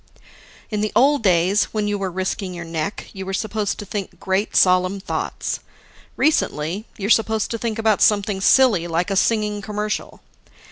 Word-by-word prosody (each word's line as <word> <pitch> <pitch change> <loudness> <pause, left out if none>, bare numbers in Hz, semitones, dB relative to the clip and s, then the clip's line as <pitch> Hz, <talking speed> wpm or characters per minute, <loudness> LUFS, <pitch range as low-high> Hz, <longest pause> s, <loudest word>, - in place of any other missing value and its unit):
In 210 -1 -1
the 215 - -1
old 285 +2 +4
days, 190 0 +3
when 210 -1 -2
you 205 -1 -1
were 195 -1 -2
risking 185 +1 -3
your 170 -1 -6
neck, 165 +3 -4
you 190 - -6
were 195 0 -3
supposed 215 -1 -2
to 205 - -7
think 200 -1 -6
great 190 +2 -1
solemn 185 +1 +3
thoughts. 190 - -3 0.6
Recently, 195 - 0
you're 205 +2 -1
supposed 220 -1 +2
to 230 - -3
think 230 -1 -2
about 220 -2 +2
something 200 -2 +2
silly 210 -7 +4
like 170 +3 -1
a - - 0
singing 210 0 +1
commercial. 210 0 -4
205 Hz, 170 wpm, -21 LUFS, 185-215 Hz, 0.6 s, old